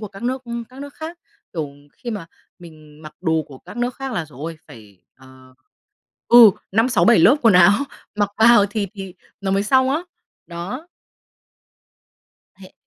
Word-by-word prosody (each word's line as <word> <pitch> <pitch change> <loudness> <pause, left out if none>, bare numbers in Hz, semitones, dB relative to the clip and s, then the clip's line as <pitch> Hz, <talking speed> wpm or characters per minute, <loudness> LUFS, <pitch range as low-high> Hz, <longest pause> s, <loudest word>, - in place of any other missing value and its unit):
của 210 - -6
các 195 +1 -13
nước 255 +2 -2 0.3
các 260 +2 -13
nước 285 0 -9
khác. 325 +2 -8 0.3
Kiểu, 155 -5 -4 0.2
khi 240 - -8
mà 205 -6 -6 0.3
mình 155 -3 -16
mặc 155 - -11
đồ 160 -3 0
của 135 -2 -12
các - - -13
nước 245 +1 -2
khác 270 -1 -6
là 170 -7 -2
giời 145 -4 -17
ôi! 165 +1 -6
Phải, 105 -5 -16
ờ 130 0 -18 0.7
ừ, 235 -3 +9 0.2
5-6-7 230 +1 +3
lớp 220 - +6
quần 225 -5 +5
áo 180 +2 +7 0.4
mặc 205 -1 0
vào 225 -2 +6
thì 205 -2 -2
thì 195 -2 -8 0.3
nó 195 -1 -2
mới 195 +1 +1
xong 260 +4 +2
á. 305 +5 -1 0.4
Đó. 195 - -7 1.7
Thế 185 -1 -15
200 Hz, 170 wpm, -20 LUFS, 160-240 Hz, 1.7 s, ừ